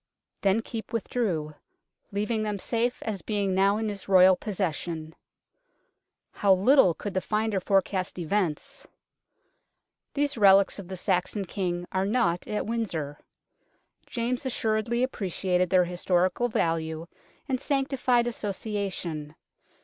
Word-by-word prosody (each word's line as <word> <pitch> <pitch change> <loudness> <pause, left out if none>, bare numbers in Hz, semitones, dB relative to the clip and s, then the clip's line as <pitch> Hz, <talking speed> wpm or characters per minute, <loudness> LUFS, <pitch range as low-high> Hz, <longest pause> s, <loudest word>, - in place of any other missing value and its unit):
Then 200 +3 +2
Keepe 225 -1 -7
with 230 - -2
drew, 165 -11 -1 0.3
" - - -48
leaving 210 +2 -1
them 210 -1 -2
safe 235 +5 -1
as 205 -4 -3
being 200 0 -1
now 195 +2 +3
in 220 0 -1
his 200 -2 -6
Royal 185 -1 +7
possession." 170 -5 -3 1.2
How 195 -2 +4
little 195 - +5
could 205 +3 -5
the 185 - 0
finder 215 -1 0
forecast 190 -1 0
events! 200 - -2 1.3
These 285 -3 0
relics 195 0 +5
of 190 - -8
the 190 0 -6
Saxon 190 +1 0
King 175 -2 -3
are 190 +1 0
not 185 -7 +1
at 210 - -2
Windsor. 170 -11 -3 0.9
James 240 +1 -2
assuredly 235 -1 0
appreciated 185 -6 0
their 185 -1 +4
historical 180 +5 +1
value 165 -4 -1 0.4
and 260 -2 -1
sanctified 265 -4 +1
association. 195 -8 -4
200 Hz, 125 wpm, -27 LUFS, 180-225 Hz, 1.3 s, Royal